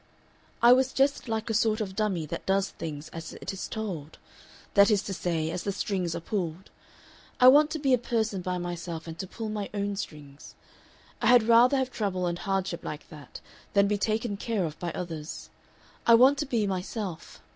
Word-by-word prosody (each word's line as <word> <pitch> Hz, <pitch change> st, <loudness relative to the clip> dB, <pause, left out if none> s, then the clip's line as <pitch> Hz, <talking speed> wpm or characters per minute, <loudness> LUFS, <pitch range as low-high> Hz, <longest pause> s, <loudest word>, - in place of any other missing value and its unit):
I 240 Hz, +1 st, +9 dB
was 260 Hz, +1 st, +2 dB
just 275 Hz, 0 st, +1 dB
like 220 Hz, -1 st, -2 dB
a -, -, -1 dB
sort 220 Hz, 0 st, +2 dB
of 195 Hz, -3 st, -4 dB
dummy 195 Hz, -7 st, 0 dB
that -, -, -6 dB
does 195 Hz, 0 st, +1 dB
things 150 Hz, -2 st, -7 dB
as 165 Hz, -1 st, -8 dB
it -, -, -6 dB
is 195 Hz, -, -5 dB
told 180 Hz, -9 st, -5 dB, 0.6 s
that 200 Hz, 0 st, +6 dB
is 210 Hz, -2 st, +2 dB
to 195 Hz, -, -4 dB
say, 165 Hz, -3 st, -1 dB
as 175 Hz, -, -3 dB
the 200 Hz, -, -2 dB
strings 185 Hz, -4 st, -2 dB
are -, -, -2 dB
pulled. 175 Hz, -1 st, -4 dB, 0.7 s
I 250 Hz, -, +8 dB
want 295 Hz, +3 st, +6 dB
to 315 Hz, -, -3 dB
be 275 Hz, -3 st, +2 dB
a 250 Hz, -, +4 dB
person 220 Hz, -5 st, -1 dB
by 180 Hz, 0 st, -2 dB
myself, 175 Hz, -2 st, -5 dB
and 165 Hz, -1 st, -7 dB
to 190 Hz, -, -4 dB
pull 220 Hz, +3 st, -6 dB
my 210 Hz, -1 st, -4 dB
own 200 Hz, 0 st, -1 dB
strings. 150 Hz, -7 st, -8 dB, 0.7 s
I -, -, +2 dB
had 245 Hz, -2 st, +7 dB
rather 235 Hz, +4 st, +5 dB
have 260 Hz, -1 st, -1 dB
trouble 190 Hz, -6 st, -2 dB
and 175 Hz, 0 st, -2 dB
hardship 190 Hz, -3 st, -2 dB
like 150 Hz, -, -7 dB
that 150 Hz, -2 st, -11 dB, 0.3 s
than 200 Hz, 0 st, +4 dB
be 205 Hz, 0 st, 0 dB
taken 215 Hz, 0 st, -1 dB
care 210 Hz, -3 st, -1 dB
of 155 Hz, -2 st, -6 dB
by 175 Hz, -1 st, -3 dB
others. 160 Hz, -3 st, -6 dB, 0.6 s
I 230 Hz, -, +9 dB
want 265 Hz, +4 st, +6 dB
to 300 Hz, -, -2 dB
be 230 Hz, -5 st, +1 dB
myself. 190 Hz, -2 st, -5 dB
200 Hz, 200 wpm, -28 LUFS, 175-225 Hz, 0.7 s, I